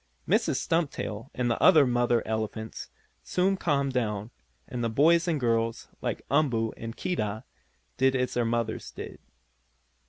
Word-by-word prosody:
Mrs. - - +2
Stumptail, 135 -8 -2
and 125 -1 0
the - - -1
other 160 -6 +7
mother 120 -1 +2
elephants, 110 0 -4 0.3
soon 190 +2 +1
calmed 140 -7 0
down, 105 -3 -2 0.4
and 120 -1 -4
the 115 - +1
boys 165 +8 +4
and 160 -4 +1
girls, 115 -2 0
like - - -3
Umboo 125 -7 +2
and 115 0 -7
Keedah, 110 - -2 0.5
did 130 +1 +3
as 125 -1 0
their 120 - +1
mothers 115 -1 -2
did. - - -9
120 Hz, 145 wpm, -28 LUFS, 115-145 Hz, 0.5 s, other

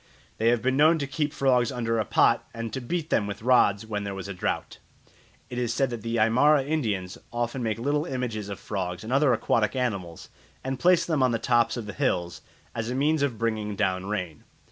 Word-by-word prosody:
They 110 - +2
have 120 -1 +3
been 130 +1 +2
known 155 +4 +5
to 145 - -2
keep 145 +1 -2
frogs 125 -4 +2
under 115 -2 -1
a 110 - 0
pot - - +3
and 115 -1 -5
to 130 - -3
beat 160 +6 -3
them 105 - +2
with 100 +1 -6
rods 110 -4 +4
when 105 -2 -3
there 100 -1 -4
was 95 0 -6
a 100 - -5
drought. 90 - -3 0.7
It 125 - -5
is 120 -1 -1
said 135 -1 +1
that 120 -2 -5
the 115 +2 -3
Aymara 130 +7 +4
Indians 105 -12 -2
often 120 +2 -2
make 110 -2 -1
little 145 +5 0
images 120 - -3
of 100 - -6
frogs 90 -2 -4
and 115 +4 -4
other 140 0 +4
aquatic 115 0 +1
animals 100 -10 -3 0.3
and 130 0 -3
place 180 +2 +4
them 155 -5 0
on 130 -2 +3
the - - +2
tops 120 +1 +2
of 115 - -5
the 105 - -6
hills 90 -11 -1 0.3
as 115 0 -3
a 125 - -2
means 150 +3 +2
of 135 -5 0
bringing 110 -2 -2
down 95 -2 -1
rain. 90 -7 -4
115 Hz, 220 wpm, -26 LUFS, 105-135 Hz, 0.7 s, known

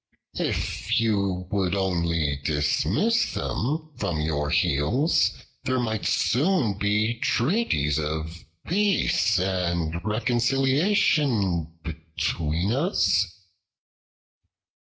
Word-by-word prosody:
If 110 +5 -1
you 100 -5 0
would 95 -2 0
only 85 -6 0
dismiss 80 - +1
them 155 +6 -2
from 90 -8 -1
your 75 -1 -1
heels, 85 - +2 0.3
there 130 -1 0
might 110 -3 -2
soon 140 - +2
be 105 +3 +1
treaties 115 - +1
of 80 +2 -4 0.2
peace 185 - +2
and 85 -3 -1
reconciliation 120 - +1
between 80 +2 -2
us." 130 - +2
100 Hz, 80 wpm, -25 LUFS, 80-130 Hz, 0.3 s, heels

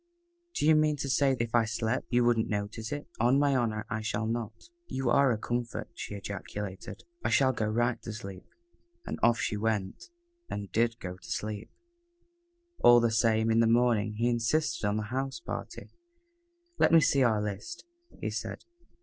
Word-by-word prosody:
"Do - - 0
you 160 - +6
mean 155 0 +3
to 140 - -3
say 135 +1 +3
that 115 - -1
if 115 - -6
I 120 -1 +4
slept 110 +2 -2
you 120 -1 +3
wouldn't 120 -2 +2
notice 105 +2 -3
it?" 145 0 -4
"On 120 +4 +4
my 140 -1 +3
honor 110 -4 0
I 110 - -3
should 105 0 -2
not." 115 - -5 0.2
"You 130 -2 -1
are 140 0 +5
a 115 - 0
comfort," 120 +2 -3
she 105 - -6
ejaculated. 100 0 -6 0.2
"I - - +1
shall 130 -1 +3
go 110 -2 -1
right 120 +2 0
to 115 - -6
sleep." 100 -3 -8 0.6
And - - -5
off 115 0 +4
she 105 - -1
went, 105 - -2 0.4
and 100 -1 -5
did 115 +1 +1
go 90 -1 -6
to - - -14
sleep. 105 0 -4 1.1
All 120 0 +7
the 115 -1 +2
same, 110 0 +2
in 115 - +3
the 115 - +4
morning, 115 -2 +2
he 115 +3 +1
insisted 120 +1 0
on 105 +1 0
the 110 - -1
house 135 +1 -2
party. - - -7 0.9
"Let - - +5
me 165 - +8
see 140 -2 +3
our 115 -4 +3
list," 105 - -5 0.3
he - - -3
said. - - -5
115 Hz, 185 wpm, -29 LUFS, 105-125 Hz, 1.1 s, me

